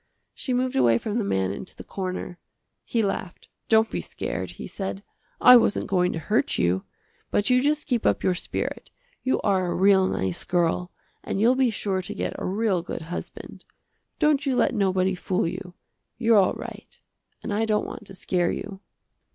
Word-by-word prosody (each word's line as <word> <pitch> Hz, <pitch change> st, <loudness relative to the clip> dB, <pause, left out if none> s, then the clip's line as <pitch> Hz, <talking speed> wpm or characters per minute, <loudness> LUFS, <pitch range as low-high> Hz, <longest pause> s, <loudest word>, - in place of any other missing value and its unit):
She 260 Hz, -, -4 dB
moved 255 Hz, +1 st, 0 dB
away 120 Hz, -3 st, +4 dB
from 215 Hz, -, -2 dB
the -, -, 0 dB
man 95 Hz, -, 0 dB
into 100 Hz, -, -7 dB
the -, -, -10 dB
corner. 185 Hz, -2 st, -5 dB, 0.4 s
He 230 Hz, -2 st, 0 dB
laughed, 190 Hz, -2 st, -4 dB, 0.2 s
"Don't 220 Hz, 0 st, +4 dB
be -, -, -2 dB
scared," -, -, -4 dB
he -, -, -8 dB
said, 195 Hz, 0 st, -5 dB, 0.4 s
"I 250 Hz, -, +9 dB
wasn't 225 Hz, -, +2 dB
going 180 Hz, -2 st, +1 dB
to -, -, -3 dB
hurt 215 Hz, -, 0 dB
you. 90 Hz, +2 st, +1 dB, 0.4 s
But 205 Hz, +4 st, +1 dB
you 250 Hz, 0 st, +5 dB
just 300 Hz, +2 st, +1 dB
keep 245 Hz, -6 st, 0 dB
up -, -, +1 dB
your 185 Hz, -, +3 dB
spirit. 180 Hz, -, -4 dB, 0.3 s
You 260 Hz, -, +1 dB
are 190 Hz, -3 st, +1 dB
a -, -, -1 dB
real 190 Hz, 0 st, +5 dB
nice 95 Hz, -, -1 dB
girl, 175 Hz, 0 st, 0 dB, 0.3 s
and -, -, -3 dB
you'll 235 Hz, +4 st, +5 dB
be 260 Hz, -1 st, +3 dB
sure 195 Hz, -3 st, -1 dB
to 180 Hz, -, -6 dB
get -, -, -2 dB
a -, -, -4 dB
real 195 Hz, -1 st, +1 dB
good 165 Hz, -1 st, -6 dB
husband. -, -, -8 dB, 0.5 s
Don't 300 Hz, -3 st, +3 dB
you 270 Hz, -3 st, +1 dB
let -, -, +2 dB
nobody 190 Hz, -3 st, +1 dB
fool 180 Hz, -1 st, -1 dB
you. 180 Hz, +1 st, -6 dB, 0.4 s
You're 225 Hz, -2 st, +5 dB
all 190 Hz, -, +3 dB
right -, -, -10 dB, 0.4 s
and -, -, -3 dB
I 220 Hz, +2 st, +1 dB
don't 215 Hz, -1 st, +1 dB
want 210 Hz, -, -8 dB
to 195 Hz, -, -9 dB
scare 180 Hz, -1 st, 0 dB
you." 195 Hz, -2 st, -5 dB
195 Hz, 190 wpm, -25 LUFS, 180-225 Hz, 0.5 s, I